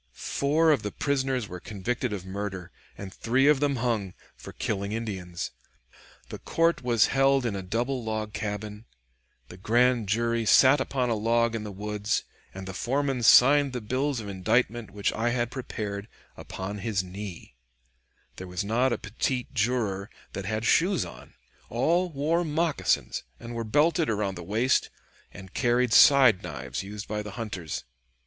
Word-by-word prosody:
Four 150 - +2
of 145 - +2
the 105 - -4
prisoners 135 -4 -1
were 90 -1 -7
convicted 115 +5 -3
of 95 -3 -5
murder, 95 -2 -5 0.3
and 95 -1 -8
three 130 +4 +1
of 150 -2 +5
them 145 -1 +1
hung, 115 -6 -1 0.2
for - - -10
killing 100 -1 -3
Indians. 95 -6 -4 0.8
The - - -7
court 165 +1 +1
was 120 -3 +3
held 135 -1 +3
in 110 -4 -1
a 95 - -3
double 120 +7 -2
log 110 -1 -3
cabin, 105 +1 -5 0.6
the 90 - -11
grand 120 +1 +2
jury 115 +2 +1
sat 130 +5 +6
upon 130 -2 -1
a - - +3
log 115 +2 +1
in 115 -2 -3
the 105 - -6
woods, 105 +2 -2 0.3
and 95 0 -8
the 95 - -6
foreman 135 +5 -1
signed 140 +4 +6
the 125 - -2
bills 130 +4 -1
of 105 - -7
indictment, 110 +3 0
which 100 0 -1
I 115 +2 0
had 120 -1 -1
prepared, 105 -6 -5 0.3
upon 95 +2 -6
his 100 -2 -1
knee; 90 -7 -8 0.8
there 95 - -7
was 90 +1 -3
not 120 +5 +2
a - - 0
petit 120 +4 -2
juror 105 -4 0 0.2
that 95 - -5
had 110 +2 -2
shoes 180 - +3
on; - - -13 0.3
all 170 +10 +1
wore 160 +3 0
moccasins, 160 -1 0 0.2
and 120 - -8
were 115 0 -3
belted 155 +8 +2
around 105 -3 -1
the 90 - -8
waist, 110 +9 +1 0.4
and 95 0 -12
carried 120 -1 +2
side 130 -8 +7
knives 65 - -5
used 105 +2 -7
by 105 0 -3
the 105 -2 -8
hunters." 100 -9 -5
115 Hz, 165 wpm, -27 LUFS, 100-130 Hz, 0.8 s, side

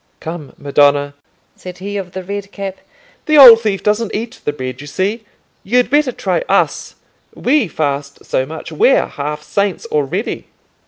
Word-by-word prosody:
"Come, 160 -3 -7
madonna," 145 0 +2 0.4
said 180 -1 -10
he 200 +2 -6
of 190 -3 -5
the 190 - -5
red 200 +1 -6
cap, 195 -1 -6 0.5
"the 305 0 +4
old 240 -5 +10
thief 205 -4 -2
doesn't 210 +1 0
eat 230 +4 -5
the - - +1
bread, 130 -2 -6
you 145 - -10
see: 205 +9 -2 0.4
you'd 245 +5 +1
better 290 -2 +3
try - - -1
us. - - 0 0.4
We 260 -3 +1
fast 140 -3 -3
so 130 - 0
much, 160 +2 -8
we're - - +3
half 150 +1 -5
saints 200 +1 -2
already." 155 - -2
190 Hz, 160 wpm, -16 LUFS, 145-225 Hz, 0.5 s, old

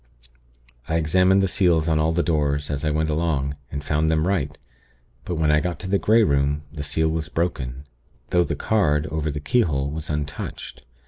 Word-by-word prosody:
"I 80 - 0
examined 90 +4 +3
the - - +3
seals 85 -4 +2
on 80 -1 +2
all 80 +1 +2
the 85 +1 +1
doors, 75 -3 0
as 70 +1 -3
I 75 - +1
went 80 +1 0
along, 75 -3 -1 0.2
and 70 0 -4
found 75 +1 +1
them 80 +1 +1
right; 80 -6 -1 0.7
but 90 - -3
when 80 -1 +2
I 75 - +4
got 90 +1 -3
to 95 - -5
the 100 +1 +1
Grey 110 +2 +4
Room, 70 -2 +1
the 75 - -5
seal 80 +2 0
was 80 -1 -2
broken; 70 -6 -3 0.5
though 90 0 +4
the - - -3
card, 75 -9 +1
over 80 0 -1
the 75 0 -3
keyhole, 75 - +1
was 80 +1 -5
untouched. 75 -1 -5
80 Hz, 195 wpm, -23 LUFS, 75-85 Hz, 0.7 s, I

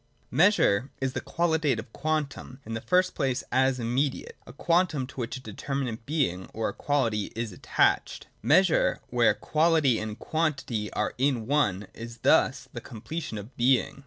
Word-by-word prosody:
107.] - - -9
Measure 150 - +4
is 135 -1 -1
the - - -3
qualitative 160 -9 0
quantum, 145 -3 -3
in 115 - -6
the 115 - -3
first 185 +5 +2
place 130 -2 -1
as 130 0 +2
immediate, 130 +4 -1
— - - -36
a - - -9
quantum, 165 -2 +1
to 130 - -15
which 125 0 -3
a - - -9
deter 130 +4 -6
minate 125 -5 -2
being 130 - -1
or 110 0 -1
a - - -6
quality 115 -8 0
is 115 -1 -3
attached. 90 - 0 0.2
Measure, 185 -3 +3
where 120 -3 +4
quality 155 0 +2
and 110 0 -5
quantity 135 -9 -2
are - - -1
in 130 -4 +1
one, 105 -8 +1
is 115 +1 -9
thus - - +3
the - - -6
completion 115 +2 -6
of 105 +5 -9
Being. 125 +2 +2
130 Hz, 170 wpm, -27 LUFS, 115-150 Hz, 0.2 s, Measure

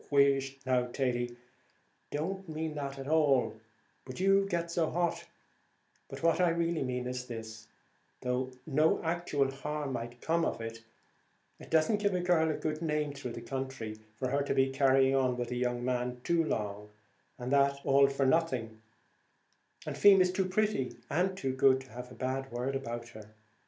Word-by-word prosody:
"Whisht, 135 -1 +2
now, 125 -1 +2
Thady; 120 -1 -1
I - - -17 0.7
don't 190 +5 -3
mean 160 0 -3
that 140 -2 -4
at 135 0 -7
all 145 -7 +2 0.4
but 130 +3 -8
you 195 +1 +4
get 170 -2 -1
so 165 -2 +1
hot 175 0 -1 0.8
but - - -8
what 165 +2 +3
I 175 - +5
really 170 0 0
mean 125 -1 -2
is 125 0 -4
this; 110 -2 -8 0.5
though 125 0 -1 0.2
no 155 +1 +3
actual 160 -5 0
harm 145 0 -4
might 120 0 -5
come 165 +4 +1
of - - -1
it, 115 0 -6 0.8
it - - -12
doesn't 160 +7 +3
give 200 -2 +1
a - - +1
girl 175 -3 +3
a 155 - 0
good 155 0 -3
name 150 -2 -1
through 135 -4 -6
the 115 - -7
country, 130 -5 -4 0.2
for 130 +2 -3
her 140 +1 +2
to 140 - -1
be 135 0 +3
carrying 135 0 +4
on 130 -2 +2
with 120 -1 -3
a - - -1
young 120 0 -1
man 125 0 -1
too 170 -1 +2
long, 105 -6 -3 0.5
and 125 +1 -5
that 140 0 +4
all 140 0 +5
for 140 0 0
nothing; 130 -8 0 1.0
and - - -4
Feemy's 190 -3 +7
too 190 0 0
pretty 185 -8 0 0.2
and 185 +4 +1
too 135 -7 -1
good, 130 0 +4
to 130 - -15
have 125 +2 -8
a - - -10
bad 135 +1 -3
word 125 +3 -2
about 120 -3 -4
her. 110 -1 -13
135 Hz, 180 wpm, -31 LUFS, 125-160 Hz, 1.0 s, Feemy's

